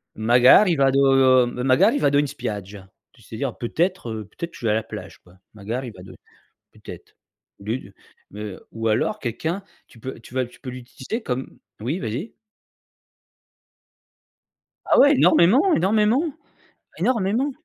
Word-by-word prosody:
«Magari 125 Hz, -, +5 dB
vado 135 Hz, -2 st, +4 dB
magari 130 Hz, -, +2 dB
vado 140 Hz, -, +3 dB
in 145 Hz, -, +2 dB
spiaggia» 100 Hz, -6 st, -7 dB, 0.2 s
tu 130 Hz, -, -23 dB
sais 110 Hz, +1 st, -10 dB
dire: 135 Hz, -4 st, -3 dB
«Peut-être, 170 Hz, +4 st, -2 dB
heu, 110 Hz, -1 st, -6 dB
peut-être, 170 Hz, -, -8 dB
je -, -, -9 dB
vais -, -, +3 dB
à -, -, +1 dB
la 110 Hz, -, -1 dB
plage», -, -, -10 dB
quoi. 90 Hz, +1 st, -21 dB, 0.2 s
«Magari 115 Hz, +5 st, -5 dB
vado», 95 Hz, -3 st, -13 dB, 0.6 s
peut -, -, -21 dB
être. -, -, -15 dB, 0.5 s
Au -, -, -13 dB
lieu 110 Hz, +5 st, -2 dB
de, 100 Hz, -, -16 dB, 0.4 s
heu 105 Hz, -3 st, -8 dB
ou 115 Hz, 0 st, -2 dB
alors 110 Hz, -, 0 dB
quelqu'un, 160 Hz, -, -3 dB, 0.3 s
tu 115 Hz, -, -18 dB
peux 130 Hz, +2 st, -7 dB
tu 115 Hz, -, -16 dB
vas 130 Hz, -1 st, 0 dB
tu 120 Hz, -, -18 dB
peux 130 Hz, -, -7 dB
l'utiliser 130 Hz, -, -7 dB
comme 130 Hz, -, -5 dB, 0.2 s
oui, 130 Hz, +11 st, -2 dB
vas-y. 130 Hz, -, -5 dB, 2.5 s
Ah -, -, +3 dB
oui, 285 Hz, -, +7 dB
énormément, 265 Hz, -, +4 dB
énormément, 215 Hz, -, +2 dB, 0.8 s
énormément. 235 Hz, +3 st, 0 dB
130 Hz, 150 wpm, -22 LUFS, 115-175 Hz, 2.5 s, oui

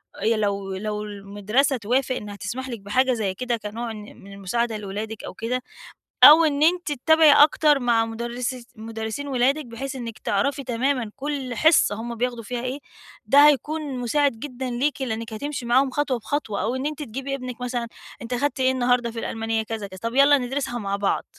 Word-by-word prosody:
آآ -, -, -9 dB
يا 225 Hz, 0 st, +3 dB
لو 200 Hz, -2 st, -2 dB
لو 210 Hz, +2 st, -3 dB
المدرسة 205 Hz, +6 st, -1 dB
توافق 250 Hz, +4 st, 0 dB
إنّها 205 Hz, -3 st, -6 dB
تسمح 240 Hz, +7 st, -5 dB
لِك 235 Hz, -3 st, -5 dB
بحاجة 255 Hz, +6 st, +1 dB
زي 210 Hz, -5 st, -1 dB
كده 240 Hz, +4 st, -2 dB
كنوع 225 Hz, +2 st, -5 dB
إن 215 Hz, -1 st, -8 dB, 0.2 s
من 200 Hz, +1 st, -12 dB
المساعدة 220 Hz, +4 st, -2 dB
لولادِك 210 Hz, +2 st, -6 dB
أو -, -, -7 dB
كده 240 Hz, +5 st, -3 dB, 0.6 s
أو 320 Hz, +2 st, +10 dB
إن 290 Hz, -1 st, +1 dB
أنتِ 345 Hz, 0 st, +2 dB
تتابعي 315 Hz, +3 st, +5 dB
أكتر 295 Hz, 0 st, +5 dB
مع 235 Hz, -3 st, +2 dB
مُدرسي 240 Hz, +2 st, -4 dB
مُدرسين 225 Hz, +4 st, -5 dB
ولادِك 270 Hz, +3 st, +1 dB
بحيث 260 Hz, +4 st, -6 dB
إنّك 235 Hz, -3 st, -7 dB
تعرفي 275 Hz, +8 st, -1 dB
تمامًا 250 Hz, -1 st, -1 dB
كل 275 Hz, -3 st, -4 dB
حِصّة 305 Hz, -5 st, +4 dB
هم 235 Hz, +2 st, -5 dB
بياخدوا 240 Hz, 0 st, -2 dB
فيها 240 Hz, +2 st, -4 dB
إيه، 255 Hz, +3 st, -3 dB, 0.5 s
ده 285 Hz, +2 st, +7 dB
هيكون 295 Hz, -1 st, 0 dB
مُساعد 280 Hz, +4 st, +2 dB
جدًا 260 Hz, -1 st, -5 dB
ليكِ، 270 Hz, +4 st, -1 dB
لإنّك 225 Hz, -2 st, -4 dB
هتمشي 285 Hz, +2 st, -4 dB
معاهم 260 Hz, +3 st, +3 dB
خطوة 270 Hz, -2 st, -1 dB
بخطوة. 225 Hz, -4 st, -3 dB
أو 235 Hz, +3 st, -1 dB
إن 260 Hz, +1 st, -3 dB
أنتِ 300 Hz, 0 st, -3 dB
تجيبي 270 Hz, +2 st, -4 dB
إبنِك 255 Hz, -2 st, -7 dB
مثلًا، 245 Hz, -1 st, -2 dB, 0.3 s
أنت 235 Hz, +1 st, -5 dB
أخدت 285 Hz, +3 st, -1 dB
إيه 260 Hz, 0 st, +3 dB
النهاردة 245 Hz, -2 st, +1 dB
في 230 Hz, -, -6 dB
الألمانية؟ 225 Hz, 0 st, -2 dB
كذا، 220 Hz, -2 st, -5 dB
كذا، 190 Hz, -1 st, -11 dB
طب 230 Hz, +1 st, -3 dB
يالّا 280 Hz, +1 st, +6 dB
ندرسها 250 Hz, -1 st, -3 dB
مع 200 Hz, -2 st, -2 dB
بعض 200 Hz, 0 st, -1 dB
245 Hz, 190 wpm, -24 LUFS, 220-275 Hz, 0.6 s, أو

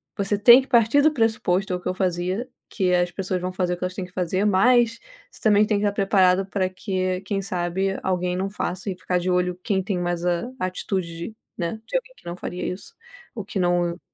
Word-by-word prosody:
você 200 Hz, 0 st, 0 dB
tem 240 Hz, +5 st, +8 dB
que 265 Hz, -, -12 dB
partir 235 Hz, +3 st, +4 dB
do 310 Hz, +1 st, +4 dB
pressuposto, 210 Hz, -7 st, 0 dB
é -, -, +1 dB
o -, -, -4 dB
que -, -, -3 dB
eu -, -, -1 dB
fazia, 185 Hz, +5 st, -1 dB, 0.2 s
que 185 Hz, -3 st, 0 dB
as 175 Hz, 0 st, +2 dB
pessoas 185 Hz, 0 st, -3 dB
vão 180 Hz, 0 st, -2 dB
fazer 180 Hz, -1 st, -1 dB
o -, -, -4 dB
que 180 Hz, -, -7 dB
elas 180 Hz, +2 st, -3 dB
têm 190 Hz, -, -4 dB
que 180 Hz, -, -16 dB
fazer, 185 Hz, +2 st, -1 dB
mas 230 Hz, +3 st, +4 dB, 0.3 s
você -, -, -16 dB
também 210 Hz, -1 st, +4 dB
tem 210 Hz, -1 st, +1 dB
que 205 Hz, -, -2 dB
estar 205 Hz, -, +2 dB
preparado 195 Hz, -2 st, +3 dB
para 190 Hz, -1 st, -1 dB
que, 185 Hz, -1 st, -2 dB
quem 195 Hz, 0 st, -2 dB
sabe, 190 Hz, +1 st, -2 dB
alguém 180 Hz, -1 st, -1 dB
não 190 Hz, +1 st, -1 dB
faça 190 Hz, 0 st, -3 dB
e 185 Hz, -, -5 dB
ficar 180 Hz, +1 st, -1 dB
de 180 Hz, +1 st, -1 dB
olho 180 Hz, 0 st, 0 dB
quem 195 Hz, -3 st, 0 dB
tem 190 Hz, -1 st, -2 dB
mais 175 Hz, -1 st, -2 dB
a 175 Hz, +7 st, -1 dB
atitude, 185 Hz, 0 st, -3 dB, 0.2 s
né, 175 Hz, +5 st, -3 dB
de -, -, 0 dB
alguém -, -, -7 dB
que -, -, -23 dB
não 170 Hz, -, -4 dB
faria 180 Hz, -, -5 dB
isso 210 Hz, -, -11 dB, 0.4 s
ou 220 Hz, -, -5 dB
que 195 Hz, -, -6 dB
não 175 Hz, -1 st, +1 dB
185 Hz, 235 wpm, -23 LUFS, 180-205 Hz, 0.4 s, tem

